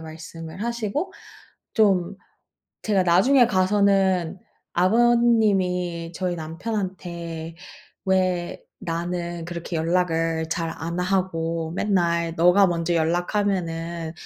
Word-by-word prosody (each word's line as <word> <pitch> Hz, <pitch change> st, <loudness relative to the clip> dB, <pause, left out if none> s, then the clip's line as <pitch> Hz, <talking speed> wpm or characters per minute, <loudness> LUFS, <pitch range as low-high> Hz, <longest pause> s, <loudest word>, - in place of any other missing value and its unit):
말씀을 160 Hz, +3 st, -9 dB
하시고 235 Hz, -, -2 dB, 0.6 s
좀, 195 Hz, -4 st, +2 dB, 0.7 s
제가 200 Hz, -4 st, +2 dB
나중에 240 Hz, +9 st, +5 dB
가서는 190 Hz, -2 st, +2 dB, 0.4 s
아버님이 190 Hz, -5 st, +2 dB
저희 180 Hz, -1 st, -2 dB
남편한테 170 Hz, -2 st, -5 dB, 0.5 s
"왜 185 Hz, -2 st, 0 dB, 0.2 s
나는 170 Hz, 0 st, -3 dB
그렇게 170 Hz, 0 st, -6 dB
연락을 165 Hz, -1 st, 0 dB
잘 165 Hz, -1 st, -1 dB
안 170 Hz, +2 st, -4 dB
하고 165 Hz, -3 st, -1 dB
맨날 170 Hz, -4 st, +1 dB
너가 180 Hz, +4 st, +5 dB
먼저 170 Hz, 0 st, -1 dB
연락하면은 170 Hz, -1 st, -1 dB
175 Hz, 205 characters per minute, -24 LUFS, 165-195 Hz, 0.7 s, 나중에